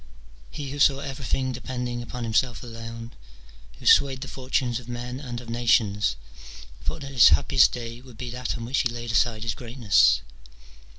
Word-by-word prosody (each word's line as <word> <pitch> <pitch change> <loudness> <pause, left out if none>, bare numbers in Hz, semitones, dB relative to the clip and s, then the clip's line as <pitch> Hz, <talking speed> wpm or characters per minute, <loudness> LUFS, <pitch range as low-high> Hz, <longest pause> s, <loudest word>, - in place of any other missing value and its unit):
He, 145 -3 -6
who 145 - -6
saw 140 -1 +5
everything 135 -1 -3
de 125 0 -7
pending 125 -2 -4
upon 120 +1 -6
himself 115 +2 0
alone, 115 0 -8 0.7
who - - -14
swayed 135 -2 +5
the 135 - -5
fortunes 125 -2 -1
of 120 -1 -13
men 120 +1 -5
and 125 -4 -6
of 120 - -12
nations, 115 - +2 0.7
thought - - -3
that 140 0 -7
his 125 -4 +7
happiest 75 -2 +4
day 120 0 -7
would 125 -3 -15
be 120 0 -5
that 125 0 -3
on 115 - -6
which 130 +4 0
he 125 - +1
laid 120 0 -5
aside 115 -1 +1
his 115 -1 -1
greatness. 115 - +3
120 Hz, 180 wpm, -25 LUFS, 115-130 Hz, 0.7 s, his